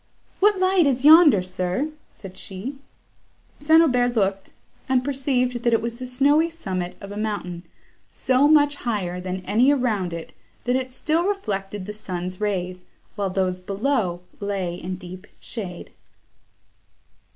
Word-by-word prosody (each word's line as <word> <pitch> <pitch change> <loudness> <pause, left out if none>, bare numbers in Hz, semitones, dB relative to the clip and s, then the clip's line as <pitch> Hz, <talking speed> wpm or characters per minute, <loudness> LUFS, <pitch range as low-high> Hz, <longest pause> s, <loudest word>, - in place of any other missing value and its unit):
"What 415 0 +4
light 370 -3 +3
is 265 0 +1
yonder, 300 - +8
sir?" 185 +10 -2 0.2
said 190 -2 -12
she. 225 +9 -7 0.8
St. 315 +3 +5
Aubert 245 -5 +2
looked, 195 -2 0 0.4
and 255 -1 +3
perceived 255 -3 0
that 235 -1 +2
it 225 - +4
was 235 0 -4
the 255 0 -6
snowy 285 +6 +3
summit 185 - -4
of 200 0 -9
a 205 - -6
mountain, 205 -5 -3 0.5
so 260 +2 +2
much 290 -1 +4
higher 185 -8 -3
than 185 0 -5
any 245 +6 +3
around 225 -10 +1
it, 165 -1 -7 0.3
that 245 +1 +1
it 260 0 -2
still 315 +6 0
reflected 205 - -3
the 210 - -6
sun's 185 -2 -5
rays, 185 -3 -2 0.3
while 200 -2 -1
those 185 -1 -1
below 195 -2 -1 0.2
lay 195 -4 -2
in 180 +1 -5
deep 185 +1 -10
shade. 185 -7 -6
215 Hz, 145 wpm, -23 LUFS, 185-275 Hz, 0.8 s, yonder